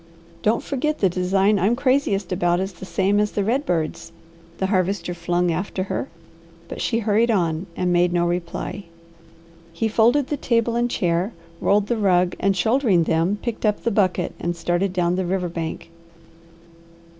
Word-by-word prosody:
"Don't 220 +2 +1
forget 300 +3 -1
that 190 -3 +2
the 185 - -4
design 195 +3 +2
I'm 205 +6 +2
craziest 255 -8 +1
about 175 -1 +1
is 190 +1 -3
the 190 - -10
same 195 +4 +1
as 210 0 0
the 205 - 0
red 260 +8 0
bird's," 165 -1 -2 0.5
the 190 - -1
Harvester 185 -2 0
flung 175 0 0
after 185 +3 -2
her, - - -3 0.6
but - - -7
she 230 - 0
hurried 225 +1 +2
on 175 -4 0
and 180 -1 +1
made 175 0 +3
no 175 0 +1
reply. 175 +3 -3 0.9
He 170 +7 -1
folded 235 +6 +3
the 295 - -1
table 235 -2 +1
and 240 +1 +1
chair, 180 +1 0 0.3
rolled 205 0 +2
the 235 +2 -1
rug, 185 -3 +2
and 195 -1 +1
shouldering 220 -3 +3
them 165 +5 +1
picked 235 -3 -4
up 210 -2 +1
the 235 - +1
bucket 185 -4 +1
and 175 0 -2
started 175 +3 0
down 180 -1 0
the 185 - -1
river 180 -1 -1
bank. 165 0 -5
190 Hz, 175 wpm, -22 LUFS, 175-220 Hz, 0.9 s, made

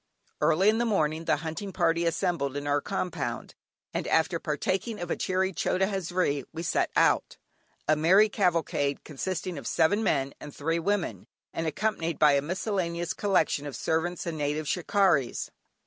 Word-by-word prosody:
Early 165 +5 +3
in 220 +1 +4
the 240 - +2
morning 160 -7 0
the 160 - +3
hunting 190 +5 -4
party 170 -1 +1
assembled 165 -5 -1
in 145 - -4
our 145 0 +1
compound, 185 -1 -3 0.4
and, - - -2
after 160 +1 +2
partaking 190 - -2
of 175 -1 -4
a - - +1
cheery 190 +1 0
"chota 185 +2 +1
hazri," 180 -7 -1
we 165 +1 -5
set - - +1
out, - - +2 0.5
a 155 - +4
merry 185 +8 +5
cavalcade 165 -8 0
consisting 175 +2 -4
of 130 - -7
seven 175 +6 +2
men, 140 -8 +1
and 145 - -10
three 165 +3 -1
women, 200 +2 -1 0.3
and 165 - -2
accompanied 170 -2 -1
by 150 -1 +6
a 140 0 +3
miscellaneous 175 0 -2
collection 160 -7 +1
of 140 - -6
servants 165 +7 -1
and 165 -3 -4
native 150 +1 -1
"shikarries." 180 - +1
170 Hz, 165 wpm, -28 LUFS, 150-190 Hz, 0.5 s, by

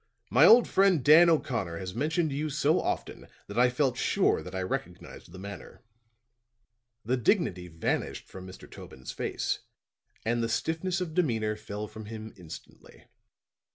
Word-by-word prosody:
"My - - +7
old 235 +2 +7
friend 190 -7 +3
Dan 165 +4 +8
O'Connor 115 - 0
has 90 +1 -6
mentioned 160 - 0
you 150 +3 -2
so 150 +3 +2
often - - -4 0.2
that 100 +4 -4
I 125 0 +5
felt 125 0 0
sure - - +2
that 90 +1 -9
I 95 - -2
recognized 90 - -6
the 95 - -11
manner." 100 +5 -10 1.2
The 125 +3 +1
dignity 115 - +1
vanished 80 -1 -3
from 95 -1 -10
Mr. 95 - -12
Tobin's 65 0 -10
face, - - -2 0.7
and 120 +1 +1
the 115 - -1
stiffness 170 +9 -1
of 170 -3 -4
demeanor 115 -11 0
fell 105 0 -6
from 110 +1 -10
him 110 0 -8
instantly. 85 -4 -13
120 Hz, 155 wpm, -28 LUFS, 100-155 Hz, 1.2 s, Dan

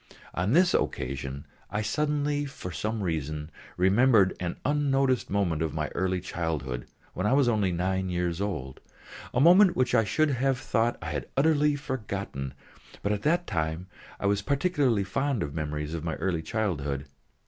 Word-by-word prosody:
On 90 +6 0
this 180 +3 +5
occasion, 70 +2 -2 0.2
I 105 +2 -2
suddenly 145 +2 0
for 135 -10 -7
some 110 +4 -2
reason 75 -2 -3 0.3
remembered 100 +2 +4
an 85 -1 -3
unnoticed 135 -3 +2
moment 90 -6 0
in 80 -2 -1
my 75 -1 -1
early 95 0 -1
childhood 80 -9 -3 0.3
when 95 +3 -1
I 125 - +3
was 140 -2 +4
only 105 -5 +2
nine 95 +2 -1
years 90 0 -1
old 65 -11 -3 0.5
a - - 0
moment 180 +5 +7
which 125 -1 +1
I 115 -3 +5
should 155 +7 +2
have 135 0 +1
thought 115 0 0
I 80 - -4
had 70 -4 -4
utterly 150 0 +3
forgotten; 100 - -4 0.5
but 100 - +1
at 105 -1 -1
that 170 +7 +2
time 80 +2 -2 0.3
I - - -3
was 100 0 +2
particularly 140 - +1
fond 135 +5 -1
of 70 - -5
memories 75 -1 -3
of 80 -2 -4
my 80 -2 -2
early 85 0 -1
childhood. 75 -9 -2
100 Hz, 165 wpm, -28 LUFS, 80-135 Hz, 0.5 s, moment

